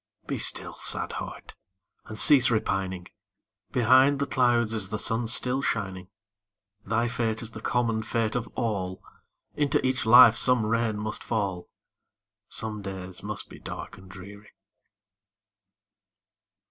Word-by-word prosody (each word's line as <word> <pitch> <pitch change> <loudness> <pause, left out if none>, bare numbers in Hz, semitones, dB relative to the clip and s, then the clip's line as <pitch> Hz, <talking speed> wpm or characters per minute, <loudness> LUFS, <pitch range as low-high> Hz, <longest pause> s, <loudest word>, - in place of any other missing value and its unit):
Be - - -3
still, - - -3
sad - - -1
heart! - - -9 0.5
and 110 - -8
cease 130 -1 +6
repining; 95 -5 -1 0.6
Behind 130 +4 +5
the 140 - -1
clouds 120 -4 +2
is 105 -4 -1
the 110 - -2
sun 115 +2 -1
still 125 +3 -1
shining; 95 -8 -3 0.8
Thy 115 +3 0
fate 115 -2 -2
is 115 - -6
the - - -9
common 115 -2 0
fate 115 -1 -1
of 120 -1 -2
all, 95 -6 -3 0.5
Into 145 -1 +1
each 130 -3 0
life 120 -1 +9
some 125 -2 +2
rain 115 -1 0
must 105 +1 -4
fall, 100 -6 -2 0.8
Some 110 -1 -4
days 95 -2 -7
must - - -6
be - - -13
dark - - -8
and 95 0 -15
dreary. 100 +3 -12
110 Hz, 135 wpm, -27 LUFS, 100-120 Hz, 0.8 s, life